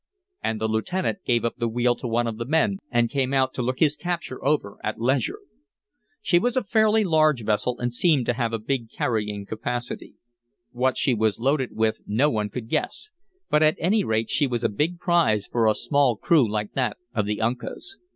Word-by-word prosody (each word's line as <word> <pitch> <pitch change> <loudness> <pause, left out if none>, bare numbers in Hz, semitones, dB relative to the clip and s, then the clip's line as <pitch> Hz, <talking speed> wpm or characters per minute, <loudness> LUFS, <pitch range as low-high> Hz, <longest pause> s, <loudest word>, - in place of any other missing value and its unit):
And 110 -1 -1
the 110 - 0
lieutenant 175 - -1
gave 120 -1 +2
up 115 - -2
the 120 -1 -1
wheel 120 +2 +2
to - - -5
one 120 +1 +1
of 115 -2 -3
the 115 - -3
men 195 +7 +2
and 120 -2 +2
came 135 +1 -1
out 130 -1 +2
to - - -3
look 125 +1 -1
his 150 0 +3
capture 170 -6 -4
over 135 -8 0
at 105 0 -3
leisure. 135 - 0 0.9
She 175 - +4
was 245 +6 0
a 255 - +2
fairly 220 +1 +3
large 155 - +3
vessel 110 +4 0
and 120 -1 -2
seemed 145 -2 +2
to 120 - +1
have 120 -1 -1
a 115 - -1
big 115 +1 -3
carrying 105 -3 -2
capacity. 120 +3 -5 0.6
What 125 +1 0
she 130 - +2
was 110 -2 +1
loaded 130 +1 0
with 110 0 0
no 130 +9 +2
one 105 -2 -1
could 110 +1 -6
guess, 430 - -2 0.4
but 150 - +2
at 155 0 +4
any 200 +5 +2
rate 110 -4 -1
she 145 - +2
was 120 -3 -2
a - - +2
big 155 +11 -1
prize 165 - +2
for 115 -2 +1
a 110 - +3
small 140 -5 +2
crew 135 0 +3
like 105 -1 -3
that 125 -6 -1 0.2
of 105 -4 0
the 105 0 -2
Uncas. 125 - -2
125 Hz, 210 wpm, -24 LUFS, 110-155 Hz, 0.9 s, She